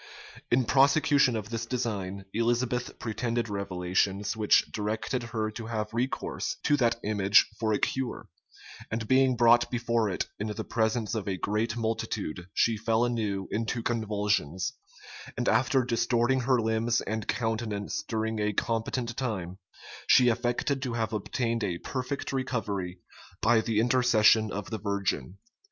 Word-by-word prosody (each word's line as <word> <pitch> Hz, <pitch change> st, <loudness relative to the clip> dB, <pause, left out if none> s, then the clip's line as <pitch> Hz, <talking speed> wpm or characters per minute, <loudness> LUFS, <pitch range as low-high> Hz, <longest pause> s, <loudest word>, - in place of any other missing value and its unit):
In 125 Hz, +1 st, +3 dB
prosecution 140 Hz, +1 st, +4 dB
of 105 Hz, -1 st, -4 dB
this 115 Hz, 0 st, -3 dB
design, 100 Hz, -6 st, -3 dB
Elizabeth 120 Hz, +2 st, 0 dB
pretended 115 Hz, 0 st, -2 dB
revelations 100 Hz, +1 st, -1 dB
which 110 Hz, -1 st, +4 dB
directed 110 Hz, +4 st, -2 dB
her 110 Hz, -2 st, -2 dB
to 110 Hz, +1 st, -7 dB
have 110 Hz, -2 st, -3 dB
recourse 125 Hz, +3 st, -2 dB
to 145 Hz, -, +3 dB
that 120 Hz, -3 st, +2 dB
image 100 Hz, 0 st, +4 dB
for 110 Hz, -1 st, 0 dB
a 105 Hz, -, +2 dB
cure; 130 Hz, -2 st, -2 dB, 0.6 s
and 110 Hz, 0 st, -3 dB
being 130 Hz, 0 st, +4 dB
brought 120 Hz, 0 st, +5 dB
before 115 Hz, -3 st, 0 dB
it, 95 Hz, -, -2 dB
in 105 Hz, -, -2 dB
the 110 Hz, +1 st, -4 dB
presence 110 Hz, -1 st, 0 dB
of 110 Hz, -4 st, -3 dB
a 95 Hz, -2 st, -1 dB
great 110 Hz, +5 st, -1 dB
multitude, 110 Hz, -6 st, -3 dB
she 115 Hz, -1 st, +2 dB
fell 115 Hz, +2 st, +1 dB
anew 105 Hz, -5 st, -2 dB
into 115 Hz, +1 st, -2 dB
convulsions: 105 Hz, -7 st, -1 dB, 0.6 s
and 120 Hz, -, -1 dB
after 130 Hz, +3 st, +3 dB
distorting 120 Hz, +2 st, +1 dB
her 130 Hz, 0 st, +2 dB
limbs 115 Hz, +1 st, +1 dB
and 110 Hz, 0 st, -4 dB
countenance 110 Hz, -3 st, -2 dB
during 110 Hz, -1 st, -2 dB
a 105 Hz, 0 st, 0 dB
competent 115 Hz, +2 st, -1 dB
time, 100 Hz, -9 st, -3 dB, 0.5 s
she 125 Hz, -2 st, +6 dB
affected 120 Hz, +4 st, 0 dB
to 130 Hz, -3 st, -3 dB
have 115 Hz, -1 st, -2 dB
obtained 115 Hz, +2 st, -1 dB
a 90 Hz, -4 st, -1 dB
perfect 135 Hz, +7 st, -4 dB
recovery 100 Hz, -9 st, -2 dB, 0.4 s
by 115 Hz, -2 st, +4 dB
the 110 Hz, -1 st, 0 dB
intercession 115 Hz, -3 st, +4 dB
of 105 Hz, +1 st, -5 dB
the 110 Hz, -, -3 dB
Virgin. 100 Hz, -6 st, -2 dB
115 Hz, 145 wpm, -28 LUFS, 105-120 Hz, 0.6 s, she